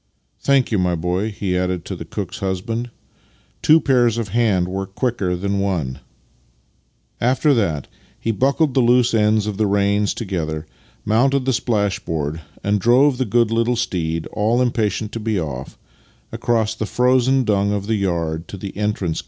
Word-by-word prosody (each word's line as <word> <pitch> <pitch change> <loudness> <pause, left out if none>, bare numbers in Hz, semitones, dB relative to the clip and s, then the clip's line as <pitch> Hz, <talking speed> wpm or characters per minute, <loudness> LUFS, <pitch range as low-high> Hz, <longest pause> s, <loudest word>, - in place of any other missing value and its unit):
" - - -46
Thank 135 -3 +4
you, 105 - +2
my 90 -1 +1
boy," 90 +6 -1
he 100 -3 -3
added 90 -1 -1
to - - -5
the - - -8
cook's - - -5
husband. 110 +6 -3 0.4
" - - -36
Two 155 +1 +6
pairs 125 -6 +2
of 115 -4 -3
hands 105 -5 +2
work 95 +1 -5
quicker 110 -8 0
than 100 +2 -1
one." 85 -10 -2 1.2
After 130 +5 +3
that 85 - 0 0.3
he 115 - -1
buckled 135 +6 +1
the 130 - +2
loose 120 0 +4
ends 105 -1 +3
of 105 -2 -3
the 110 -1 +2
reins 100 +1 +1
together, 80 -8 -3 0.4
mounted 130 +5 +2
the 130 - +2
splashboard, 100 - -1 0.2
and 100 0 +1
drove 130 +4 +4
the 130 - +1
good 115 +1 +2
little 115 +2 +1
steed, 85 -7 -2
all 110 +4 +1
impatient 110 -4 0
to 115 - -5
be 110 -2 -1
off, 70 -5 -6 0.5
across 110 -2 0
the 110 -1 -4
frozen 130 +2 +3
dung 100 -2 +1
of 100 -1 -2
the 110 - -1
yard 85 -5 -1
to 100 - -8
the 95 +1 -7
entrance 100 -5 -1
gates. - - -1
105 Hz, 175 wpm, -20 LUFS, 95-120 Hz, 1.2 s, Two